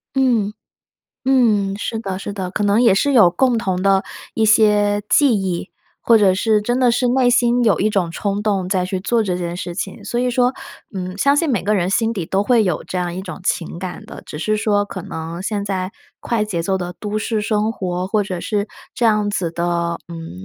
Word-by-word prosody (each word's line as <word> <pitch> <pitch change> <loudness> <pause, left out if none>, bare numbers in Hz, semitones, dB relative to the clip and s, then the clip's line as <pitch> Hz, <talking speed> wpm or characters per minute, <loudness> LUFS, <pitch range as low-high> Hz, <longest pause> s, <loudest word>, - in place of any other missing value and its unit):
嗯， 240 -6 +2 0.7
嗯， 220 -7 +2
是 220 +2 -3
的， 195 -4 -4
是 205 - -6
的。 190 -3 -4
可 210 - -1
能 205 +2 +3
也 230 -6 +5
是 280 +9 +2
有 220 -9 +6
共 245 +6 +2
同 190 -5 -1
的 195 0 +3 0.3
一 225 - +1
些 210 -1 +4
记 280 -5 +4
忆， 185 -1 -3 0.3
或 230 - +5
者 195 -3 +4
是 210 +2 +2
真 240 +4 0
的 250 -2 +4
是 245 +1 +1
内 250 0 +3
心 245 0 +3
有 215 - +3
一 215 - +2
种 190 -5 0
冲 200 +4 -2
动 195 -4 0
再 185 -1 +1
去 185 0 -3
做 230 +4 +1
这 185 -4 -1
件 175 -1 -4
事 175 -1 -5
情。 195 +1 -5
所 240 - -2
以 250 0 +1
说， 245 +1 +2 0.4
嗯， 185 -1 -5
相 280 +6 +3
信 330 +2 +1
每 230 -7 0
个 210 +3 +1
人 185 -2 0
心 225 +3 +1
底 190 -7 -3
都 195 +4 +1
会 235 +1 +3
有 180 -5 -1
这 - - -5
样 175 -1 -2
一 185 - -4
种 190 0 -8
情 170 -2 -2
感 185 -1 -6
的， - - -10
只 150 - -8
是 215 +6 0
说 210 -1 +1
可 195 -2 -7
能 165 +2 -6
现 205 0 -2
在 190 -1 -3 0.3
快 230 -3 0
节 180 -6 -3
奏 190 +3 0
的 175 -1 -5
都 210 0 -2
市 220 0 -1
生 210 0 0
活， 180 -4 -3
或 210 +2 +1
者 185 -3 -5
是 205 -1 -1 0.3
这 235 - +1
样 210 -2 +2
子 185 -4 -2
的， 170 0 -1
嗯， 165 - -8
205 Hz, 240 characters per minute, -19 LUFS, 185-225 Hz, 0.7 s, 有